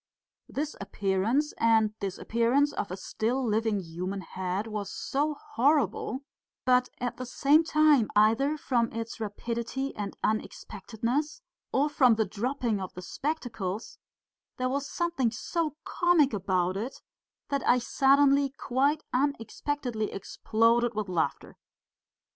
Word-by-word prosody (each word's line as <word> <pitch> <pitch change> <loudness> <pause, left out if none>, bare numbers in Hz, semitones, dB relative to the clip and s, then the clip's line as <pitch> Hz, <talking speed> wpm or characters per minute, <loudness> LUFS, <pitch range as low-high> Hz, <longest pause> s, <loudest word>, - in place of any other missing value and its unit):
This 295 +2 -3
appearance 200 +9 0
and 220 -2 +4
disappearance 235 +8 +1
of 200 - -3
a 185 - -5
still 240 +7 -1
living 220 -1 +1
human 185 +3 -5
head 185 +3 -3
was 210 -3 -4
so 295 +2 -1
horrible, 265 - 0 0.4
but 250 0 +4
at 245 -1 -3
the 255 - -5
same 295 +5 +4 0.5
either 230 +8 +4
from 240 -5 0
its 230 0 -5
rapidity 235 +5 -3
and 205 -2 -5
unexpectedness 235 - -2 0.3
or 280 +3 +2
from 260 -6 +4
the 220 0 +1
dropping 230 +1 -2
of 185 - -5
the 180 - -7
spectacles 230 - -4 0.6
there 255 0 0
was 280 +2 -2
something 340 -8 0
so 300 +7 -2
comic 345 -7 +3
about 185 -2 0
it 230 +7 -5 0.5
that 280 -1 0
I 245 - +6
suddenly 275 +2 +4
quite 275 +3 0
unexpectedly 250 -2 -1
exploded 230 +4 +1
with 210 -2 -2
laughter. 170 -3 -2
235 Hz, 120 wpm, -28 LUFS, 210-275 Hz, 0.6 s, I